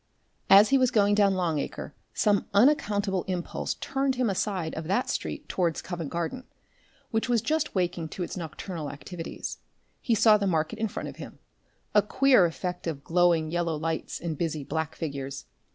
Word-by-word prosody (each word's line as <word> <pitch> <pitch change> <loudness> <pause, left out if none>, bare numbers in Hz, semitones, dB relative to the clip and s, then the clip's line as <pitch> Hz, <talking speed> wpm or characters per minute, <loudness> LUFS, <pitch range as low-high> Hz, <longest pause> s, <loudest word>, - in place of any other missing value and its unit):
As 200 +2 +8
he 275 - +4
was 255 -1 +4
going 205 -3 +3
down 200 -2 +4
Long 170 -5 0
Acre - - -5 0.2
some 205 -2 +1
unaccountable 205 -6 +3
impulse 180 -2 -3
turned 270 -1 -1
him 245 -4 +1
aside 185 -4 -2
out - - -4
of 160 - -7
that 200 +8 +1
street - - -4
towards 170 -4 -1
Covent 170 -5 -5
Garden, 170 +10 -3 0.7
which 225 +2 0
was 240 -1 +3
just 310 +4 -1
waking 175 -3 -1
to 180 - -4
its - - -5
nocturnal 165 -2 -5
activities. 165 +4 -7 0.4
He 235 - +2
saw 215 0 +6
the 200 -1 -1
market 160 -3 0
in 220 - +1
front 205 - -5
of - - -11
him - - -9 0.6
a 210 - +6
queer 255 -2 +4
effect 180 +1 -5
of 145 -4 -4
glowing 170 -2 +2
yellow 170 -2 0
lights 160 +1 -3
and 165 -2 -3
busy 160 -3 -2
black 160 +2 -3
figures. 140 -3 -5
180 Hz, 180 wpm, -27 LUFS, 160-210 Hz, 0.7 s, As